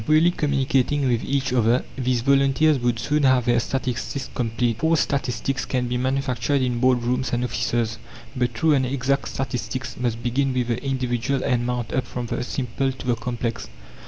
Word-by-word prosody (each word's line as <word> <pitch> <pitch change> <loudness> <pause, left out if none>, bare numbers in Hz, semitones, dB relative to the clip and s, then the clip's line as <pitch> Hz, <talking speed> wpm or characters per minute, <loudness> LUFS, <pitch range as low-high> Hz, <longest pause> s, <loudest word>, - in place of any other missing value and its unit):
Freely 155 +3 +5
communicating 140 -2 +1
with 120 -2 +1
each 135 -1 -1
other, 120 +1 +3
these 125 -2 0
volunteers 140 +3 +3
would 120 -1 0
soon 150 +6 0
have 130 -3 +4
their 120 -1 +3
statistics 130 +1 -3
complete. 115 -1 -1
False 160 0 +3
statistics 135 0 -1
can 125 -2 -1
be 120 - -2
manufactured 135 +1 0
in 125 -2 0
board 125 -1 +3
rooms 125 +2 0
and 120 0 +1
offices, 115 -2 -1 0.4
but 125 -1 0
true 160 +6 +3
and 135 -2 +3
exact 135 +1 0
statistics 130 0 -4
must 120 -2 -2
begin 130 +2 0
with 125 -1 0
the 120 +2 -1
individual 130 -1 -1
and 125 -3 +1
mount 125 -2 -2
up 130 - 0
from 125 -1 -4
the 120 - -3
simple 135 +1 -2
to 130 - -10
the 125 - +2
complex. 115 - -4
125 Hz, 180 wpm, -23 LUFS, 120-135 Hz, 0.4 s, Freely